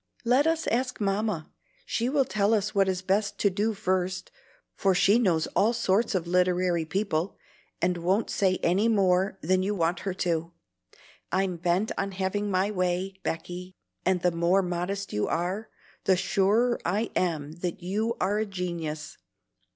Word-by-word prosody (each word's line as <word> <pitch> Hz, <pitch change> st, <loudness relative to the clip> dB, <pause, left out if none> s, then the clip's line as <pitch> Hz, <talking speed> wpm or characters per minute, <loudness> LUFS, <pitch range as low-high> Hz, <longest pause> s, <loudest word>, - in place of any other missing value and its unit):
"Let 255 Hz, +6 st, +4 dB
us 325 Hz, 0 st, +1 dB
ask 255 Hz, +2 st, -1 dB
Mamma; 200 Hz, -4 st, -1 dB, 0.3 s
she 235 Hz, +2 st, -1 dB
will 275 Hz, -1 st, +2 dB
tell 210 Hz, 0 st, +2 dB
us 210 Hz, 0 st, -1 dB
what 195 Hz, -2 st, +3 dB
is 185 Hz, 0 st, -2 dB
best 200 Hz, +2 st, 0 dB
to 200 Hz, -, +2 dB
do 210 Hz, +4 st, 0 dB
first, 185 Hz, -2 st, -1 dB, 0.4 s
for 195 Hz, -2 st, +1 dB
she 195 Hz, +4 st, +5 dB
knows 170 Hz, -9 st, +2 dB
all 220 Hz, +4 st, +4 dB
sorts 225 Hz, -2 st, +1 dB
of 175 Hz, -2 st, 0 dB
literary 180 Hz, -1 st, +2 dB
people, 185 Hz, 0 st, -1 dB, 0.5 s
and 180 Hz, 0 st, +2 dB
won't 185 Hz, +6 st, 0 dB
say 190 Hz, -2 st, +2 dB
any 190 Hz, +6 st, +3 dB
more 190 Hz, -2 st, +2 dB
than 185 Hz, +3 st, +2 dB
you 205 Hz, +2 st, -1 dB
want 170 Hz, 0 st, 0 dB
her 190 Hz, -2 st, -3 dB
to. 170 Hz, -2 st, -1 dB, 0.8 s
I'm 190 Hz, -1 st, +1 dB
bent 175 Hz, +5 st, 0 dB
on 195 Hz, 0 st, -2 dB
having 195 Hz, +2 st, -1 dB
my 190 Hz, +2 st, +1 dB
way, 185 Hz, 0 st, -1 dB
Becky, 180 Hz, +2 st, -5 dB, 0.3 s
and 185 Hz, -1 st, +1 dB
the 180 Hz, -, +4 dB
more 170 Hz, +3 st, +2 dB
modest 180 Hz, +3 st, -3 dB
you 105 Hz, -, 0 dB
are, 185 Hz, +6 st, -2 dB, 0.4 s
the 190 Hz, -1 st, +4 dB
surer 205 Hz, +6 st, +2 dB
I 205 Hz, +6 st, -1 dB
am 155 Hz, -5 st, 0 dB
that 175 Hz, 0 st, -4 dB
you 215 Hz, +6 st, -1 dB
are 200 Hz, +3 st, +1 dB
a 220 Hz, -, 0 dB
genius. 170 Hz, -5 st, -4 dB
190 Hz, 165 wpm, -27 LUFS, 180-205 Hz, 0.8 s, she